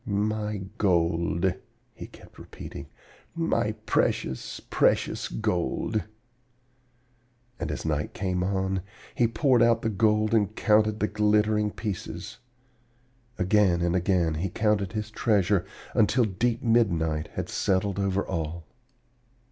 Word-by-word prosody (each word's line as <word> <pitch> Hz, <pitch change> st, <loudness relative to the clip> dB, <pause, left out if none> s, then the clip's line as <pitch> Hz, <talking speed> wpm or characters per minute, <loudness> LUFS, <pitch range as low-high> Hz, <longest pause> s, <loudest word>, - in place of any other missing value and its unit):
'My 105 Hz, 0 st, -1 dB, 0.2 s
gold,' 85 Hz, -1 st, +1 dB, 0.4 s
he -, -, -9 dB
kept -, -, -17 dB
repeating, -, -, -9 dB, 0.5 s
'my -, -, 0 dB
precious, 65 Hz, -, -1 dB
precious -, -, +1 dB
gold!' 105 Hz, 0 st, -1 dB, 1.5 s
And -, -, -3 dB
as -, -, -5 dB
night 75 Hz, -2 st, -2 dB
came 90 Hz, -2 st, -1 dB
on, 95 Hz, 0 st, -1 dB, 0.3 s
he 120 Hz, -, +3 dB
poured 120 Hz, +2 st, +2 dB
out 115 Hz, -1 st, +4 dB
the 110 Hz, -, +1 dB
gold 110 Hz, +1 st, +2 dB
and 105 Hz, -1 st, +2 dB
counted 110 Hz, 0 st, +2 dB
the 105 Hz, -, +2 dB
glittering 105 Hz, 0 st, +2 dB
pieces. 105 Hz, -3 st, -6 dB, 1.0 s
Again 95 Hz, -2 st, +3 dB
and 85 Hz, +1 st, +1 dB
again 90 Hz, -3 st, +1 dB
he 85 Hz, +5 st, -2 dB
counted 100 Hz, -1 st, 0 dB
his 110 Hz, 0 st, -4 dB
treasure 100 Hz, -4 st, +1 dB, 0.3 s
until 115 Hz, +3 st, +3 dB
deep 110 Hz, +4 st, -1 dB
midnight 85 Hz, -10 st, +2 dB
had -, -, -3 dB
settled 95 Hz, +1 st, 0 dB
over 100 Hz, 0 st, 0 dB
all. 85 Hz, -2 st, -4 dB
100 Hz, 115 wpm, -27 LUFS, 90-110 Hz, 1.5 s, out